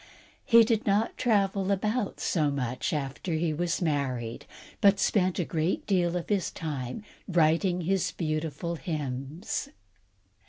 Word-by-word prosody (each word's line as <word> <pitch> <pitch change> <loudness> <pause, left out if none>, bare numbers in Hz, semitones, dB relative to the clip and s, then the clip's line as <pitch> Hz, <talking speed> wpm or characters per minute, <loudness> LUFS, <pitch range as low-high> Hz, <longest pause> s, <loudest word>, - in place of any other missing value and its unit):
He 230 -3 +7
did 225 -1 0
not 205 +3 +2
travel 200 -4 +1
about 210 +3 -1
so 155 -4 +1
much 130 -3 -2
after 150 +3 -3
he 160 0 0
was 175 +3 -1
married, 130 -7 -2 0.3
but 200 -2 +5
spent 185 -3 +2
a 175 - 0
great 160 +2 -1
deal 180 -3 +1
of 175 - -5
his 200 -3 +1
time 150 - -5 0.2
writing 175 +1 +2
his 190 +2 +1
beautiful 160 +1 -3
hymns. 150 - -4
170 Hz, 130 wpm, -28 LUFS, 150-195 Hz, 0.3 s, He